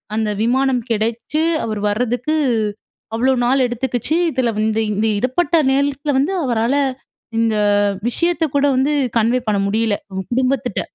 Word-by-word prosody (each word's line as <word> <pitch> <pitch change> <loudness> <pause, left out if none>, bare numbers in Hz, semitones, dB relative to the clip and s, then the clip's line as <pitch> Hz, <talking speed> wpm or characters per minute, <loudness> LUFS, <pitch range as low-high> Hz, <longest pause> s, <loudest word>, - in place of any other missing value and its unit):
அந்த 220 -1 0
விமானம் 255 0 +1
கெடைச்சு 230 +7 -1 0.2
அவரு 215 -2 -3
வர்றதுக்கு, 245 +7 -1 0.8
அவ்வளோ 260 +3 +2
நாள் 260 +1 +3
எடுத்துக்கிச்சு. 245 +4 -2 0.2
இதில 250 -2 0
வந்து, 215 +1 +1 0.2
இந்த - - -2
இந்த 220 +2 +1
இடப்பட்ட 285 +8 0 0.2
நேரத்துல 285 +2 0
வந்து, 300 +8 0
அவரால 235 +1 +1 0.6
இந்த 225 -1 +1 0.5
விஷயத்தை 335 +5 +1
கூட 280 - +3
வந்து 280 +3 +2 0.3
கன்வே 235 +3 +1
பண்ண 205 - +1
முடியல. 220 0 +1
அவங்க 190 -1 -5
குடும்பத்திட்ட. 255 -2 0
245 Hz, 135 wpm, -19 LUFS, 225-275 Hz, 0.8 s, நாள்